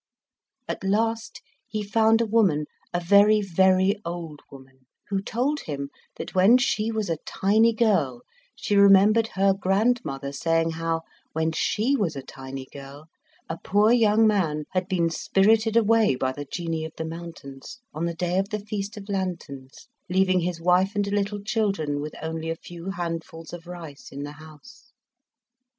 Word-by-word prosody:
At - - -5
last 225 +3 -1 0.2
he 215 -1 -3
found 220 +2 +3
a - - +2
woman, 200 -9 +2 0.3
a 175 - 0
very, 205 +4 +5
very 190 +1 +2
old 170 -3 -6
woman, 130 -1 -16 0.2
who 195 -1 0
told 260 +9 -1
him 140 -2 -5 0.2
that - - -7
when 195 +7 +6
she 225 -3 0
was 220 -2 -2
a 165 - -1
tiny 220 +4 +3
girl 190 - +1 0.3
she 205 - -1
remembered 200 +3 +6
her 195 0 +4
grandmother 195 - 0
saying 165 +3 0
how, 165 0 -2 0.3
when 160 0 0
she 220 - +1
was 190 - -1
a 135 - -6
tiny 135 0 -8
girl, 140 +3 -11 0.4
a 165 0 -5
poor 210 +3 +3
young 225 -2 +4
man 170 -8 +1
had 185 0 -1
been 170 -3 +1
spirited 220 +6 +2
away 225 - +4
by 130 +1 -1
the 145 +2 -7
Genii 165 -2 -3
of 160 - -8
the 160 - -3
mountains, 165 - -9
on 160 +3 -2
the 170 - -4
day 180 +2 0
of 195 +1 -2
the 215 - -2
Feast 205 0 -4
of 200 -1 -9
Lanterns, 175 -9 -5 0.2
leaving 185 0 +3
his 175 -1 -2
wife 180 +4 +2
and 205 -1 +1
little 205 0 -1
children 195 -9 -1
with 150 +1 -6
only 160 0 -4
a 165 - -1
few 170 +2 -9
handfuls 165 -3 -5
of 175 0 -9
rice 165 -5 -10
in 140 +1 -6
the 145 - -6
house. 155 - -15
185 Hz, 165 wpm, -25 LUFS, 160-210 Hz, 0.4 s, when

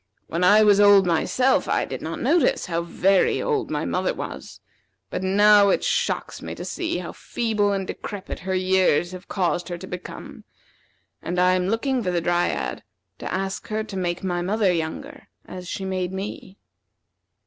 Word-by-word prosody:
When 170 +2 -2
I 205 +4 +6
was 205 -1 +5
old 205 -2 +7
myself, 250 +10 +1
I - - +1
did - - -6
not - - -5
notice 345 - +2
how 170 -1 -1
very 185 +2 +2
old 450 -4 -1
my - - -2
mother - - -1
was; - - -7 0.5
but - - -3
now 205 +1 +5
it - - +1
shocks 485 0 -1
me - - -6
to - - -7
see - - -3
how - - -5
feeble 215 -3 -1
and 195 -1 -1
decrepit 200 +1 -6
her 190 +1 -3
years 185 -2 +2
have 185 +1 -10
caused 175 -2 -1
her 175 - -4
to 180 - -9
become; 180 -1 -9 0.8
and 175 +2 -4
I 180 0 +4
am 180 0 0
looking 250 +5 0
for 190 - -2
the 175 -1 +1
Dryad 175 +1 -1 0.4
to - - -5
ask 190 0 -3
her 215 0 -2
to 215 - -9
make 175 -1 -2
my 175 -2 -1
mother 195 +1 +1
younger, 160 -2 -5 0.2
as 180 -1 -9
she 190 - -4
made 185 -1 -2
me." 190 0 -7
190 Hz, 180 wpm, -23 LUFS, 180-205 Hz, 0.8 s, old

